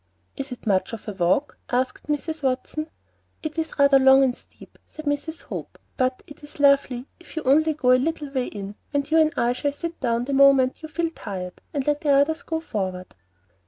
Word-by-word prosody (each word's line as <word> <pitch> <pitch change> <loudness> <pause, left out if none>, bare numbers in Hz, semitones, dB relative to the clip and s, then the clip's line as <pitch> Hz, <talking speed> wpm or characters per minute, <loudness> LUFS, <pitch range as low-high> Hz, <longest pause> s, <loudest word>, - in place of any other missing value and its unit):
"Is 275 0 -6
it 250 - -8
much 190 -1 +1
of 230 - -7
a - - -2
walk?" 190 +10 0
asked 255 +3 -1
Mrs. 305 +2 -2
Watson. 270 +4 -2 0.5
"It 310 -1 -4
is 320 - -4
rather 280 -1 +6
long 265 0 +7
and 260 - +3
rather - - -16
steep," - - -17
said 310 - -10
Mrs. 290 +3 -2
Hope; - - -7 0.2
"but 255 0 0
it 295 -2 -14
is 295 0 -11
lovely 275 -3 +3
if 350 - -15
you 315 - -3
only 310 +4 +3
go 255 -4 +3
a 255 0 +5
little 300 -1 -2
way 260 -2 -1
in, 200 -1 -7 0.2
and 285 +1 -1
you 325 - +5
and 310 -1 +4
I 240 +1 +2
will 285 - +2
sit 335 +4 -6
down 235 -2 0
the 280 - -3
moment 270 -1 +5
you 315 - -8
feel 335 +1 -1
tired, 185 - -7
and 280 -3 -2
let 295 0 +1
the 295 - -1
others 285 +4 +3
go 320 -1 -3
forward." 185 - -4
275 Hz, 215 wpm, -24 LUFS, 250-310 Hz, 0.5 s, long